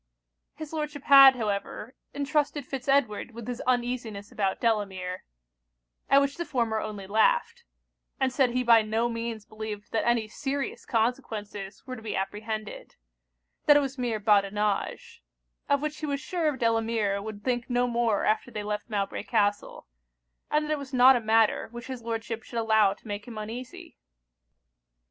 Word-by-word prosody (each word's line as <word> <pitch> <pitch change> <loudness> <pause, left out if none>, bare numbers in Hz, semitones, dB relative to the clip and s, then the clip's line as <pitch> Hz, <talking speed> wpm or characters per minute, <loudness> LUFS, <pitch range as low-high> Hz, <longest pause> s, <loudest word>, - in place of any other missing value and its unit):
His 310 0 -8
Lordship 300 -3 -4
had, 275 -1 +9
however, 215 +2 -4 0.2
entrusted 290 0 -1
Fitz 270 0 -6
Edward 240 -5 +1
with 235 -1 -8
his 245 -1 -4
uneasiness 240 -5 -1
about 195 -2 -1
Delamere; 190 -5 -1 0.8
at 275 - +7
which 280 0 -1
the 345 - -2
former 235 -8 -1
only 205 -2 -6
laughed; 465 - +1 0.5
and 265 -1 +1
said 260 -2 +3
he 250 +1 0
by 230 -2 +6
no 220 +2 0
means 230 -2 -4
believed 215 -1 -7
that 225 - 0
any 235 -2 +2
serious 275 +5 -4
consequences 220 -4 -2
were 255 - -6
to 230 - -10
be 220 - -4
apprehended: 215 +2 -5 0.7
that 295 - +8
it - - +4
was 270 -1 -4
mere 235 -3 -1
badinage; 210 - 0 0.5
of 285 0 +2
which 305 0 -3
he 310 - -4
was 280 -1 -1
sure 305 0 -1
Delamere 225 -4 0
would 205 -1 -8
think 245 0 -1
no 245 0 +2
more 235 -4 +1
after 215 +3 +1
they 210 -3 -5
left 210 +2 -4
Mowbray 200 -2 -2
Castle; 205 -2 -1 0.6
and 300 0 +1
that 305 - -4
it 305 - 0
was 275 -1 -6
not 255 +1 +8
a 245 - 0
matter 220 0 +2
which 235 0 -9
his 260 -2 -6
Lordship 225 0 -4
should 235 - -8
allow 220 -3 +3
to 220 - -18
make 205 0 -5
him 230 -3 -8
uneasy. 230 +4 -8
230 Hz, 165 wpm, -27 LUFS, 215-265 Hz, 0.8 s, had